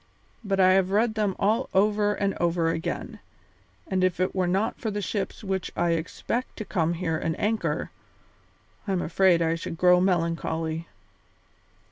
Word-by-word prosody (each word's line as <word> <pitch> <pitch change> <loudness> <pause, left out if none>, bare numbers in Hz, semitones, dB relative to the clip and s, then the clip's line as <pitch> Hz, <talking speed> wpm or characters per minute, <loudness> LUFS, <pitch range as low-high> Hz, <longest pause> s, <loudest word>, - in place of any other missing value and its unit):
But 195 -2 -1
I 185 0 +6
have 190 0 +3
read 215 +3 +2
them 210 -3 0
all 220 +6 +1
over 205 +1 +3
and 200 -1 0
over 170 -1 +1
again, 165 - -4 0.7
and 185 -1 0
if 185 -1 +1
it 185 - 0
were 185 -2 0
not 195 +5 0
for 220 - -1
the 205 0 -3
ships 200 +1 -3
which 190 -2 -2
I 175 -1 +1
expect 165 +9 -3
to 215 - -5
come 170 -4 0
here 165 -2 -1
and 160 -1 -2
anchor, 220 +1 -1 1.0
I 195 - 0
am 180 - 0
afraid 175 0 +3
I 165 0 +1
should 165 0 -5
grow 180 0 +5
melancholy." 165 -2 -1
185 Hz, 165 wpm, -26 LUFS, 170-205 Hz, 1.0 s, I